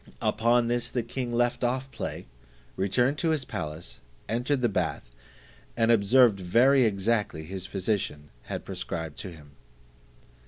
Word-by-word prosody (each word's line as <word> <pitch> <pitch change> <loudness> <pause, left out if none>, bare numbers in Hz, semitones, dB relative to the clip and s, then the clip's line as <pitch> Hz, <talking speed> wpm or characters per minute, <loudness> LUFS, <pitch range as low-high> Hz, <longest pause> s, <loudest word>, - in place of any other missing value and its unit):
Upon 120 +1 +3
this 120 0 0
the 120 - -1
king 120 +1 -4
left 120 +1 +1
off 130 +2 -1
play, 115 - -5 0.5
returned 125 +9 +1
to 165 - +1
his 155 -5 +1
palace, 80 - -6 0.3
entered 125 +5 0
the - - +5
bath, 80 - -2 0.7
and 115 0 +4
observed 115 0 +5
very 120 +8 +4
exactly 105 -4 0
his 95 +3 -6
physician 95 -7 -2
had - - -5
prescribed 75 +5 -5
to 95 - -6
him. 75 -4 -14
115 Hz, 135 wpm, -27 LUFS, 95-120 Hz, 0.7 s, the